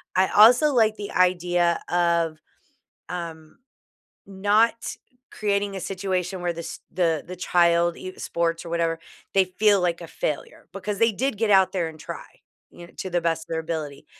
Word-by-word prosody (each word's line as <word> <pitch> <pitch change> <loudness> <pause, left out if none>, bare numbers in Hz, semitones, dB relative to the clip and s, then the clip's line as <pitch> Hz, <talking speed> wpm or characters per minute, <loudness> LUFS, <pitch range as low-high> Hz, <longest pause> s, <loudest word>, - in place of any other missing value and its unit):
I 185 0 +3
also 245 +8 +6
like 220 -3 +3
the 205 -1 -6
idea 175 -1 +2
of, 170 -2 +1 0.7
um, 165 -3 -7 0.7
not 205 +4 +1 0.4
creating 200 -1 -1
a - - -4
situation 185 -1 -3
where 175 -1 -1
this 165 0 -7
the 165 -3 0
the 185 - -7
child, 170 -1 +2
i 185 - -7
sports 170 0 -2
or - - -7
whatever, 165 -1 0 0.4
they 190 -1 +5
feel 200 +1 +3
like 175 -1 0
a 170 - -8
failure 150 -2 -5
because 200 +1 -4
they 230 0 +4
did 255 +2 -2
get 225 -1 0
out 190 -1 +5
there 175 -4 0
and 155 -1 -13
try, 150 - -7 0.5
you 175 - -12
know, - - -20
to 190 - -4
the 175 -1 0
best 165 -1 0
of - - -27
their 165 0 -1
ability. 155 -4 -5
180 Hz, 175 wpm, -24 LUFS, 170-200 Hz, 0.7 s, also